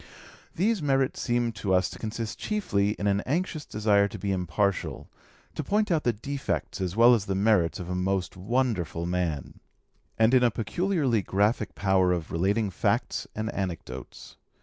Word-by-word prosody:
These 205 +2 +1
merits 135 -2 +1
seem 120 -1 +1
to 95 -4 0
us 90 - +3
to - - -10
consist 110 0 -4
chiefly 105 - 0
in 100 - -5
an 100 0 +2
anxious 155 +1 -1
desire 105 -1 +3
to - - -8
be 100 - -2
impartial, 95 +1 -1 0.4
to 155 - -4
point 210 +6 +1
out 160 -3 +1
the 120 - +4
defects 135 -1 -4
as 90 0 -2
well 120 +2 +7
as 110 -5 +1
the 95 - -1
merits 100 -4 +2
of 90 - -6
a 90 - -3
most 95 0 -1
wonderful 95 - -1
man; 85 -6 -2 0.6
and 110 +2 +4
in 130 - +6
a 120 - +5
peculiarly 135 - 0
graphic 105 +2 0
power 95 -2 +3
of 85 -3 -4
relating 100 +5 +1
facts - - -1
and 110 +1 -3
anecdotes. 80 -9 -6
105 Hz, 170 wpm, -27 LUFS, 95-125 Hz, 0.6 s, well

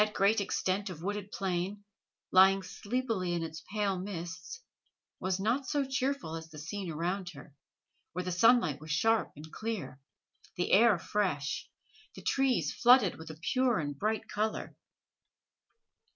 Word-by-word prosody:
That 210 0 -4
great 200 +2 +3
extent 195 0 -1
of 170 -3 -8
wooded 205 +1 -3
plain, 190 +2 -2 0.5
lying 190 +1 +6
sleepily 205 -3 -2
in 170 -1 -1
its 160 0 -7
pale 200 -3 0
mists, 180 - -6 0.6
was 185 0 -1
not 240 +7 0
so 285 +1 +1
cheerful 265 - -1
as 160 0 -7
the 155 - -12
scene 180 +5 -5
around 175 +4 -2
her, 140 +1 -12 0.6
where 180 +1 -2
the 180 - -3
sunlight 180 - +4
was 155 - -10
sharp 225 +8 +2
and 155 +2 -11
clear, 205 -13 -4 0.6
the 175 -1 -1
air 215 -1 +6
fresh, 170 -7 -1 0.5
the - - -10
trees 270 -2 +1
flooded 240 -8 +5
with 160 - -9
a 155 - -8
pure 255 -2 +3
and 145 -3 -3
bright 215 +1 -1
color. 215 +1 -2
195 Hz, 150 wpm, -31 LUFS, 170-220 Hz, 0.6 s, lying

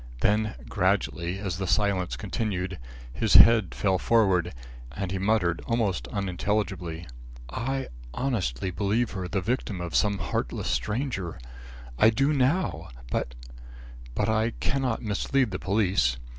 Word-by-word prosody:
Then 105 -2 +2
gradually, 85 +2 0
as 95 -2 -4
the 95 - -2
silence 100 -2 +1
continued, 95 -3 -3 0.3
his 110 - +1
head 115 -5 +7
fell 95 -2 +1
forward, 95 -7 +3 0.4
and 90 +6 -4
he 95 - -2
muttered 95 -4 +1
almost 100 - 0
unintelligibly: 95 - -2 0.5
"I 135 +3 -2 0.2
honestly 95 - -1
believe 105 +6 0
her 95 -2 -4
the 95 +2 -1
victim 110 -2 -2
of 85 -1 -5
some 100 -1 +2
heartless - - -2
stranger. 105 - -2 0.6
I 110 - +7
do 135 +6 +2
now; 145 +7 +1 0.2
but - - -2 0.8
but 105 - +1
I 110 +1 +1
cannot 130 -5 -1
mislead 115 +3 +1
the 95 - -3
police. 95 - +1
100 Hz, 130 wpm, -27 LUFS, 90-115 Hz, 0.8 s, head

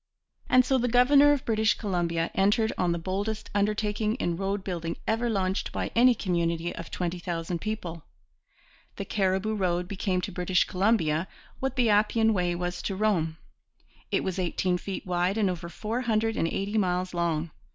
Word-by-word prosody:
And 255 0 +5
so 265 -1 +2
the 245 - +1
governor 275 +4 +6
of 285 -2 0
British 220 -1 +2
Columbia 170 -5 -1
entered 210 +3 +2
on 180 -1 +1
the 170 - 0
boldest 200 +5 -3
undertaking 210 +1 0
in 175 -9 -1
roadbuilding 185 -3 -3
ever 230 +2 0
launched 190 -2 -1
by - - -3
any 245 +1 +6
community 170 -3 -1
of 170 - -7
twenty 175 0 -3
thousand 170 0 -3
people. 180 -6 -4 0.9
The 200 - -5
Cariboo 190 +2 0
Road 180 -3 0
became 190 -1 -1
to - - -4
British 180 0 +2
Columbia 180 -4 +1 0.3
what 265 0 -2
the 240 -5 +3
Appian 220 +2 +3
Way 180 -3 0
was 175 0 -3
to 195 - -3
Rome. 180 -6 0 0.7
It - - 0
was 190 0 -2
eighteen 180 0 0
feet 195 +1 -5
wide 180 +2 0
and 200 -4 +2
over 170 -1 -6
four 220 +8 -3
hundred 225 -2 0
and 165 - +1
eighty 200 +5 -1
miles 180 -1 0
long. 170 -2 -1
190 Hz, 170 wpm, -27 LUFS, 175-220 Hz, 0.9 s, governor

